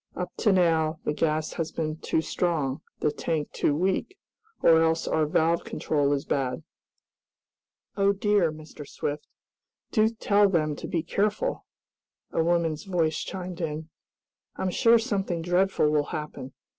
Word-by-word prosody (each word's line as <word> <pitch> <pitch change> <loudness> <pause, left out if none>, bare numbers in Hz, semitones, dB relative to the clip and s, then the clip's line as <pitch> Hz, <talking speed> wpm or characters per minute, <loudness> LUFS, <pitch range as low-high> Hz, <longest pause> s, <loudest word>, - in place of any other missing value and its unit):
Up 180 - -4
to 215 - +3
now 165 -4 +2
the 150 - 0
gas 155 0 0
has 165 -2 -3
been 155 -1 -3
too 160 - 0
strong, 155 -6 -1 0.2
the 150 - +2
tank 150 0 -2
too 145 - +1
weak, 190 - -1 0.5
or 160 -1 +6
else 165 0 +1
our 155 -1 +1
valve 165 +2 +2
control 145 -2 0
is 140 -1 0
bad." 130 -2 -1 1.3
"Oh 200 0 +3
dear, 200 -4 +2
Mr. 155 -2 -11
Swift! 145 +1 -4 0.6
Do 215 -1 +4
tell 205 -2 +3
them 155 -5 +1
to - - -6
be 165 -2 -1
careful!" 210 - -1 0.6
a 165 - +1
woman's 165 -1 0
voice 170 -5 0
chimed 180 -2 -6
in. 160 0 -4 0.7
"I'm 185 - -2
sure 230 +4 +5
something 195 -7 -2
dreadful 180 -3 +2
will 150 -1 +2
happen! 150 -4 -6
165 Hz, 145 wpm, -27 LUFS, 155-190 Hz, 1.3 s, or